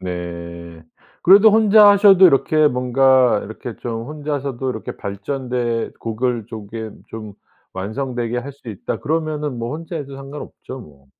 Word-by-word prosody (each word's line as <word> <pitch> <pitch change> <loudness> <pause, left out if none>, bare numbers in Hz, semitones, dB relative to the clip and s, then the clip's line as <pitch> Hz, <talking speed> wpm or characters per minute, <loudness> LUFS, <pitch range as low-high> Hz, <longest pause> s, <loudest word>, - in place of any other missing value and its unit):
네. 85 -2 -7 0.4
그래도 200 +4 +7
혼자 215 -1 +6
하셔도 200 -2 +7
이렇게 155 0 +3
뭔가 125 -2 +3
이렇게 110 +2 -8
좀 115 -1 -5
혼자서도 140 -4 -4
이렇게 110 -5 -6
발전된 120 +3 -3
곡을 115 0 -2
조겜 110 0 -8
좀 110 -2 -8 0.4
완성되게 120 +4 -3
할 135 +4 -6
수 135 -3 -14
있다 105 -4 -5
그러면은 150 -4 -2
뭐 115 +4 -4
혼자 165 +1 -7
해도 140 -3 -7
상관없죠 135 -1 -9
뭐. 70 -7 -17
125 Hz, 295 characters per minute, -20 LUFS, 110-150 Hz, 0.4 s, 그래도